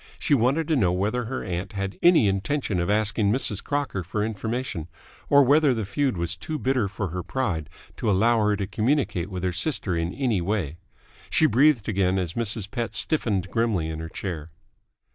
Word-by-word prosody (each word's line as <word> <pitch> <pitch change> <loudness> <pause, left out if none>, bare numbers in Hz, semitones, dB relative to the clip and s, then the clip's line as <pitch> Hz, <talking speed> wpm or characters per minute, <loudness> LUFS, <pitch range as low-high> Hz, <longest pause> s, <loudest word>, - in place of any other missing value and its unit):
She 150 - 0
wanted 140 +5 +2
to 160 - +3
know 95 -10 +3
whether 105 +7 -1
her 130 +3 -4
aunt 90 +2 -4
had 100 -1 -4
any 170 - +6
intention 100 +1 -1
of 85 - -1
asking 105 0 +2
Mrs. 110 -4 0
Crocker 140 -10 -2
for 105 +5 -2
information, 110 -5 -3 0.4
or 140 0 +7
whether 140 0 +4
the 110 -2 -2
feud 125 +3 -1
was 85 0 0
too 155 - -5
bitter 130 -6 +1
for 95 -1 -4
her 90 +3 -4
pride 90 - -2 0.3
to - - -1
allow 110 +3 +3
her 105 - +2
to 100 -1 -2
communicate 105 - 0
with 90 -2 -5
her 90 - +1
sister 95 - -1
in 85 +1 -1
any 120 -9 0
way. 85 -5 -2 0.5
She 160 - +3
breathed 135 -4 +4
again 95 -2 +1
as 90 -3 -2
Mrs. 110 -3 -1
Pett 120 -3 -3
stiffened 105 - 0
grimly 110 -9 0
in 80 0 -5
her 80 0 -6
chair. 80 -4 -5
105 Hz, 190 wpm, -25 LUFS, 90-130 Hz, 0.5 s, or